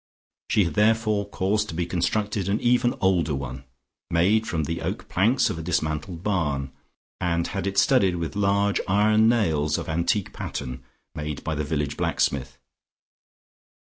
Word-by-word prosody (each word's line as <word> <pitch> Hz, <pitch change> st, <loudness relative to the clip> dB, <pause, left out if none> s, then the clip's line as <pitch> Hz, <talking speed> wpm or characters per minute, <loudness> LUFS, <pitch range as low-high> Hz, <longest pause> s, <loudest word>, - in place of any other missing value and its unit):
She 105 Hz, -, +4 dB
had 85 Hz, -3 st, -2 dB
therefore 105 Hz, -1 st, +2 dB
caused 105 Hz, +2 st, 0 dB
to 80 Hz, -, -5 dB
be 85 Hz, 0 st, -1 dB
constructed 100 Hz, +3 st, -1 dB
an 105 Hz, +3 st, +1 dB
even 120 Hz, 0 st, +2 dB
older 85 Hz, -6 st, +2 dB
one 70 Hz, 0 st, -6 dB, 0.4 s
made 100 Hz, +7 st, +2 dB
from 80 Hz, -2 st, -1 dB
the 85 Hz, +3 st, -3 dB
oak -, -, -4 dB
planks 115 Hz, +8 st, +2 dB
of 80 Hz, -, -5 dB
a -, -, -4 dB
dismantled 80 Hz, +1 st, -2 dB
barn, 75 Hz, -10 st, -1 dB, 0.5 s
and 85 Hz, -2 st, 0 dB
had 100 Hz, -1 st, -3 dB
it 100 Hz, 0 st, -3 dB
studded 100 Hz, -3 st, +4 dB
with 85 Hz, 0 st, -4 dB
large 100 Hz, 0 st, +2 dB
iron 105 Hz, +3 st, +4 dB
nails 80 Hz, -10 st, +1 dB
of -, -, -5 dB
antique 85 Hz, +5 st, 0 dB
pattern 65 Hz, +1 st, -5 dB, 0.3 s
made 75 Hz, -1 st, -5 dB
by 80 Hz, -, -2 dB
the 75 Hz, 0 st, -2 dB
village 75 Hz, -1 st, -2 dB
blacksmith. 65 Hz, 0 st, -1 dB
90 Hz, 155 wpm, -25 LUFS, 75-105 Hz, 0.5 s, She